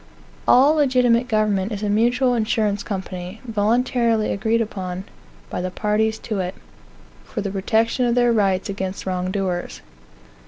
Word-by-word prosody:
All 275 +4 +6
legitimate 250 -5 +3
government 215 -3 +1
is 210 0 -4
a - - 0
mutual 245 +5 +2
insurance 215 -3 0
company, 185 -1 -6
voluntarily 230 0 +1
agreed 220 +3 +1
upon 190 -4 -4 0.5
by - - -2
the 185 - -2
parties 215 +3 0
to 215 -4 -2
it, 185 +1 -3 0.7
for 215 - -5
the 200 -1 -3
protection 225 +5 +1
of 235 - +1
their 240 -1 +3
rights 195 -4 +1
against 190 -1 -4
wrong 185 -1 -2
doers. 185 -2 -3
215 Hz, 145 wpm, -22 LUFS, 195-235 Hz, 0.7 s, All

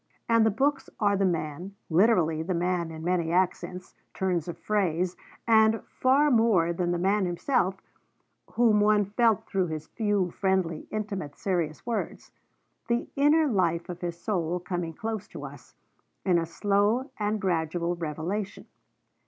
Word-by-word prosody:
And 230 -1 +4
the 220 - +4
books 270 +6 0
are 205 -2 +3
the 195 0 +1
man, 170 +3 -3
literally 165 -3 +3
the 180 +2 -2
man 175 -1 0
in 160 0 -8
many 170 -2 0
accents, 180 0 -1 0.2
turns 180 -4 -1
of 175 - -5
phrase; 185 -4 0 0.3
and, 220 0 +4
far 280 +3 +2
more 215 -8 +3
than 175 0 -1
that, 175 - 0
the 170 - -3
man 195 0 +2
himself, 190 +1 0 0.7
whom 225 -3 +4
one 210 0 +4
felt 220 +2 +2
through 190 -2 0
his 155 -1 -5
few, 205 -5 -1
friendly, 190 -5 -1
intimate, 200 -9 -4
serious 170 -6 -2
words: 235 -2 -4 0.6
the 235 0 -1
inner 295 +3 +4
life 180 - 0
of 180 0 -7
his 170 -1 -4
soul 175 -3 -1
coming 175 -2 -4
close 220 +3 -4
to - - -8
us, - - -12 0.5
in 180 -3 +3
a 165 - -3
slow 205 - +1
and 210 +1 0
gradual 170 -2 -1
revelation. 170 +5 -4
185 Hz, 155 wpm, -27 LUFS, 170-215 Hz, 0.7 s, And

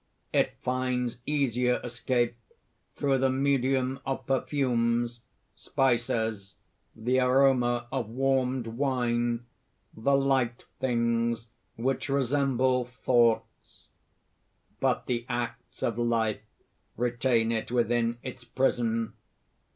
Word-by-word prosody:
It - - +2
finds 125 -1 -1
easier 125 -4 +1
escape 120 0 0 0.6
through 135 -2 +1
the 135 0 +3
medium 135 -1 +1
of 135 -1 -3
perfumes, 120 -3 0 0.3
spices, 115 -6 0 0.4
the 125 +4 +1
aroma 125 -2 +3
of 130 -5 -2
warmed 130 0 +1
wine, 120 -1 0 0.5
the 140 +5 +2
light 135 -3 +1 0.2
things 115 -2 0 0.3
which 130 +4 -1
resemble 130 -2 +2
thoughts. 120 -2 0 0.9
But - - +1
the 120 -1 -1
acts 120 -1 -4
of 115 0 0
life 115 -2 +1 0.6
retain 120 -1 +1
it 115 -1 -2
within 120 -1 +1
its 130 -1 -7
prison. 115 -2 0
125 Hz, 95 wpm, -28 LUFS, 115-130 Hz, 0.9 s, the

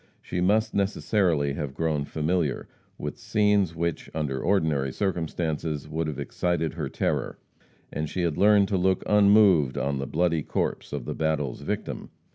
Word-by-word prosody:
She 90 - -4
must 105 +4 +2
necessarily 95 -7 +1
have 70 -2 -5
grown 80 -3 0
familiar 80 -1 -1 0.3
with - - -6
scenes 105 -5 +2
which, 85 -1 -2
under 70 -4 -2
ordinary 80 -7 +1
circumstances, 80 -5 -2
would 80 0 -2
have 75 -3 -4
excited 85 -3 -1
her 80 -5 -4
terror, - - -2 0.6
and 75 0 -3
she 90 - -2
had 85 -3 0
learned 100 -1 +5
to 100 - +1
look 95 +1 +1
unmoved 100 -9 +5
on 70 -1 -1
the 70 - -3
bloody 85 0 +1
corpse - - -3
of - - -4
the - - -3
battle's 75 -5 -1
victim. - - -4
80 Hz, 155 wpm, -26 LUFS, 75-95 Hz, 0.6 s, learned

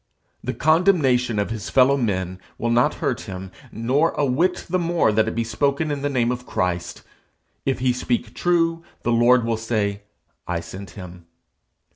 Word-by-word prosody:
The - - -3
condemnation 150 - +3
of 100 +1 -1
his 110 -3 -4
fellow 135 +1 +5
men 95 -7 -2 0.2
will 115 +1 -1
not 120 +6 +3
hurt 140 -7 -2
him, 95 0 -7 0.2
nor 130 +9 +1
a 145 - +1
whit 170 +8 +1
the 185 +1 0
more 170 -8 +2
that 110 +1 +2
it 110 - -3
be 115 - 0
spoken 140 +6 0
in 145 -1 -3
the 145 - 0
name 125 -3 +1
of 125 0 -5
Christ. 90 -1 -2 0.6
If 135 - +1
he 125 0 +1
speak 120 -2 -2
true, 165 -1 +1 0.2
the 120 - +1
Lord 120 +1 +4
will 115 -1 0
say 105 -3 -1 0.5
'I 90 -1 -1
sent 95 +3 -9
him.' 90 -3 -10
120 Hz, 175 wpm, -22 LUFS, 105-145 Hz, 0.6 s, fellow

